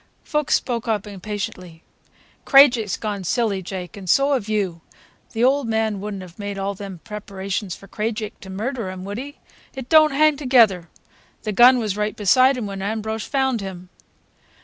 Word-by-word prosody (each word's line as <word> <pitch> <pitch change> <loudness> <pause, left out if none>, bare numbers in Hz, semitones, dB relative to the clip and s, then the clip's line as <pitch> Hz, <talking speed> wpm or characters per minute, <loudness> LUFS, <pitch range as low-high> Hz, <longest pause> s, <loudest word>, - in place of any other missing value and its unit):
'" - - -41
Fuchs 300 -2 +2
spoke 235 -2 -2
up 215 -3 0
impatiently. 190 -4 -6 0.6
"Krajiek's 250 -7 +5
gone 205 -3 -4
silly, 205 0 0
Jake, 185 -1 -7
and 190 -3 -8
so 275 +6 +4
have 225 -6 -2
you. 190 -6 -1 0.5
The 225 +1 0
old 270 0 +3
man 220 -3 -1
would 210 0 -5
n't 190 - -7
have 180 +1 -14
made 200 -1 -5
all 195 +1 -2
them 195 -3 -9
preparations 200 -3 -5
for 195 - -15
Krajiek 215 0 -4
to 195 - -11
murder 220 +2 -3
him, 185 0 -7
would 200 +3 -5
he? 285 +3 -8 0.4
It 265 -2 -7
don't 310 -1 +7
hang 300 +1 +3
together. 230 - +3 0.5
The 215 - -2
gun 245 +5 +7
was 215 -4 -2
right 210 0 -1
beside 255 +6 +4
him 235 - -3
when 195 -1 -6
Ambrosch 220 +1 -3
found 265 -5 0
him." 185 -2 -8
210 Hz, 180 wpm, -22 LUFS, 195-245 Hz, 0.6 s, don't